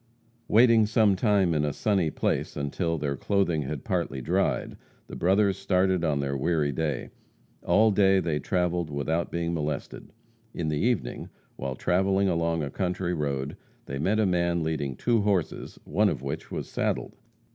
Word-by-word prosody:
Waiting 115 Hz, -1 st, +5 dB
some 110 Hz, -2 st, +3 dB
time 95 Hz, -3 st, +2 dB
in 75 Hz, -2 st, +1 dB
a 75 Hz, -, 0 dB
sunny 95 Hz, +1 st, +1 dB
place -, -, -2 dB
until 80 Hz, +4 st, -1 dB
their 70 Hz, -2 st, -2 dB
clothing 90 Hz, -1 st, 0 dB
had 70 Hz, 0 st, -5 dB
partly 70 Hz, -, -2 dB
dried, 65 Hz, -, 0 dB, 0.3 s
the -, -, -9 dB
brothers 95 Hz, +2 st, +2 dB
started 95 Hz, -1 st, +1 dB
on 75 Hz, -4 st, +1 dB
their 70 Hz, 0 st, -2 dB
weary 75 Hz, +1 st, +1 dB
way. 75 Hz, -1 st, -3 dB, 0.5 s
All 110 Hz, +1 st, +4 dB
day 95 Hz, -1 st, +4 dB
they 80 Hz, -5 st, -1 dB
travelled 90 Hz, 0 st, -1 dB
without 80 Hz, +4 st, -1 dB
being 85 Hz, 0 st, -2 dB
molested. 75 Hz, -3 st, -4 dB, 0.4 s
In 80 Hz, -3 st, -2 dB
the 75 Hz, -1 st, -1 dB
evening, 110 Hz, -, -1 dB, 0.3 s
while 65 Hz, 0 st, -4 dB
travelling 95 Hz, +5 st, +1 dB
along 85 Hz, -2 st, 0 dB
a 70 Hz, -, -4 dB
country 90 Hz, -1 st, -2 dB
road, 70 Hz, -3 st, -2 dB, 0.3 s
they 70 Hz, -, -5 dB
met 100 Hz, +9 st, +1 dB
a 110 Hz, -, +3 dB
man 85 Hz, -2 st, +1 dB
leading 75 Hz, -4 st, -2 dB
two 115 Hz, -, +1 dB
horses, 100 Hz, -5 st, -1 dB
one -, -, +2 dB
of -, -, -4 dB
which -, -, -5 dB
was -, -, -5 dB
saddled. -, -, -2 dB
85 Hz, 165 wpm, -27 LUFS, 75-95 Hz, 0.5 s, Waiting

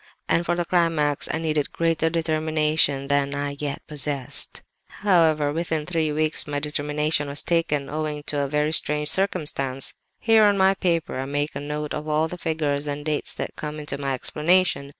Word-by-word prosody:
And 170 Hz, +1 st, +1 dB
for 175 Hz, -, +2 dB
the 175 Hz, 0 st, -1 dB
climax 165 Hz, -5 st, +1 dB
I -, -, 0 dB
needed 155 Hz, -3 st, -1 dB
greater 165 Hz, -1 st, +1 dB
determination 155 Hz, -3 st, +1 dB
than 140 Hz, 0 st, 0 dB
I 140 Hz, 0 st, -3 dB
yet 145 Hz, -1 st, -4 dB
possessed. 145 Hz, -3 st, -1 dB, 0.3 s
"However, 160 Hz, -7 st, +2 dB
within 160 Hz, -2 st, -2 dB
three 160 Hz, -2 st, 0 dB
weeks 155 Hz, +1 st, +2 dB
my 145 Hz, -1 st, -2 dB
determination 150 Hz, 0 st, -1 dB
was 140 Hz, +1 st, -1 dB
taken, 150 Hz, -5 st, 0 dB
owing 150 Hz, 0 st, -3 dB
to 145 Hz, 0 st, -2 dB
a 140 Hz, -, 0 dB
very 150 Hz, +2 st, 0 dB
strange 150 Hz, -1 st, +2 dB
circumstance. 145 Hz, -8 st, 0 dB, 0.3 s
"Here 225 Hz, -1 st, +5 dB
on 205 Hz, -1 st, +3 dB
my 190 Hz, 0 st, +5 dB
paper, 170 Hz, -7 st, -1 dB
I 135 Hz, -, -2 dB
make 145 Hz, +2 st, -2 dB
a -, -, -3 dB
note 150 Hz, +1 st, -4 dB
of 150 Hz, +1 st, -5 dB
all 155 Hz, +1 st, +1 dB
the 180 Hz, +2 st, -8 dB
figures 150 Hz, -3 st, -1 dB
and 145 Hz, 0 st, -4 dB
dates 150 Hz, -1 st, -2 dB
that -, -, -5 dB
come 150 Hz, 0 st, -5 dB
into 145 Hz, -2 st, -4 dB
my 135 Hz, -1 st, -1 dB
explanation. 155 Hz, +1 st, +1 dB
150 Hz, 180 wpm, -24 LUFS, 145-165 Hz, 0.3 s, Here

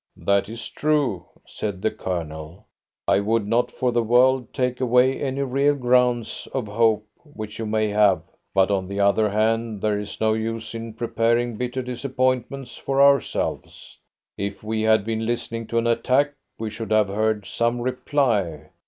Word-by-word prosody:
"That 100 Hz, 0 st, +1 dB
is 115 Hz, 0 st, -6 dB
true," 145 Hz, -, 0 dB, 0.2 s
said 100 Hz, -3 st, -5 dB
the 110 Hz, -, +2 dB
Colonel. 80 Hz, -2 st, -5 dB, 0.4 s
"I 100 Hz, -, +4 dB
would 110 Hz, +1 st, 0 dB
not 115 Hz, +3 st, +2 dB
for 125 Hz, -1 st, -1 dB
the 120 Hz, 0 st, +2 dB
world 125 Hz, +2 st, +3 dB
take 125 Hz, 0 st, -1 dB
away 125 Hz, +1 st, +3 dB
any 140 Hz, 0 st, -1 dB
real 140 Hz, +2 st, +2 dB
grounds 125 Hz, -2 st, +1 dB
of 130 Hz, -4 st, -1 dB
hope 110 Hz, 0 st, +2 dB
which 110 Hz, -10 st, -9 dB
you 110 Hz, -, -3 dB
may 110 Hz, 0 st, +1 dB
have; 100 Hz, -5 st, +3 dB, 0.3 s
but 95 Hz, +1 st, +3 dB
on 95 Hz, -2 st, 0 dB
the 100 Hz, +1 st, -4 dB
other 100 Hz, +2 st, +3 dB
hand, 110 Hz, +1 st, 0 dB
there 105 Hz, 0 st, 0 dB
is 105 Hz, -1 st, -7 dB
no 110 Hz, 0 st, +2 dB
use 110 Hz, +1 st, -3 dB
in 115 Hz, -1 st, -6 dB
preparing 115 Hz, 0 st, 0 dB
bitter 125 Hz, +3 st, -3 dB
disappointments 130 Hz, +1 st, -2 dB
for 135 Hz, 0 st, -2 dB
ourselves. 140 Hz, -1 st, +1 dB, 0.4 s
If 100 Hz, 0 st, -4 dB
we 110 Hz, 0 st, -2 dB
had 110 Hz, -2 st, +3 dB
been 110 Hz, 0 st, -2 dB
listening 115 Hz, -1 st, -3 dB
to 115 Hz, -, -2 dB
an 115 Hz, -, +1 dB
attack, 130 Hz, +5 st, +2 dB, 0.2 s
we 110 Hz, -1 st, -4 dB
should 110 Hz, +1 st, -6 dB
have 110 Hz, -2 st, +3 dB
heard 110 Hz, 0 st, 0 dB
some 115 Hz, +4 st, 0 dB
reply. 120 Hz, -, -1 dB
115 Hz, 165 wpm, -23 LUFS, 105-125 Hz, 0.4 s, I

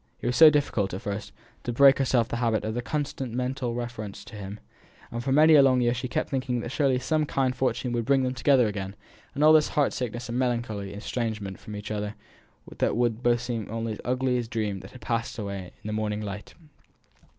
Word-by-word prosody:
It -, -, -8 dB
was 125 Hz, -, +1 dB
so 160 Hz, +2 st, +10 dB
difficult, 130 Hz, -11 st, 0 dB
at 95 Hz, -, -6 dB
first, 100 Hz, +1 st, -5 dB, 0.3 s
to 120 Hz, -, -2 dB
break 135 Hz, +3 st, +6 dB
herself 125 Hz, -3 st, +3 dB
of -, -, -22 dB
the -, -, -1 dB
habit 115 Hz, -3 st, 0 dB
of 115 Hz, +3 st, -2 dB
constant 140 Hz, -5 st, -3 dB
mental 125 Hz, -1 st, -2 dB
reference 120 Hz, -4 st, -6 dB
to 120 Hz, -, -11 dB
him; 100 Hz, 0 st, -7 dB, 0.5 s
and 120 Hz, 0 st, -4 dB
for 135 Hz, -, -1 dB
many 155 Hz, +3 st, +6 dB
a 150 Hz, -, +8 dB
long 130 Hz, -2 st, +4 dB
year 120 Hz, -1 st, +2 dB
she 125 Hz, +1 st, -3 dB
kept -, -, -2 dB
thinking 130 Hz, -2 st, -1 dB
that 120 Hz, -, -5 dB
surely 135 Hz, -3 st, +2 dB
some 155 Hz, +4 st, 0 dB
kind 130 Hz, -2 st, 0 dB
fortune 125 Hz, -1 st, -1 dB
would 120 Hz, -1 st, -1 dB
bring 135 Hz, 0 st, +3 dB
them 130 Hz, 0 st, 0 dB
together 130 Hz, 0 st, +4 dB
again, 100 Hz, -2 st, -4 dB, 0.4 s
and 145 Hz, -, +1 dB
all 155 Hz, +1 st, +8 dB
this 155 Hz, -1 st, +5 dB
heart 145 Hz, -, +3 dB
sickness 120 Hz, 0 st, -4 dB
and 120 Hz, +2 st, -2 dB
melancholy 115 Hz, -6 st, -1 dB
estrangement 105 Hz, -2 st, -4 dB
from 105 Hz, -, -8 dB
each 105 Hz, 0 st, -6 dB
other 105 Hz, 0 st, -3 dB, 0.5 s
would -, -, -14 dB
then 120 Hz, 0 st, +2 dB
seem 120 Hz, -2 st, -3 dB
to -, -, -15 dB
both 110 Hz, -, -5 dB
only 115 Hz, 0 st, -2 dB
as 105 Hz, -, -6 dB
an -, -, -12 dB
ugly 125 Hz, 0 st, +1 dB
dream 110 Hz, -4 st, -3 dB
that -, -, -11 dB
had 125 Hz, -, -14 dB
passed 115 Hz, +2 st, -2 dB
away 100 Hz, -4 st, -5 dB
in -, -, -7 dB
the 105 Hz, -, -3 dB
morning 105 Hz, -1 st, -1 dB
light. 105 Hz, -1 st, -7 dB
120 Hz, 230 wpm, -27 LUFS, 105-130 Hz, 0.5 s, so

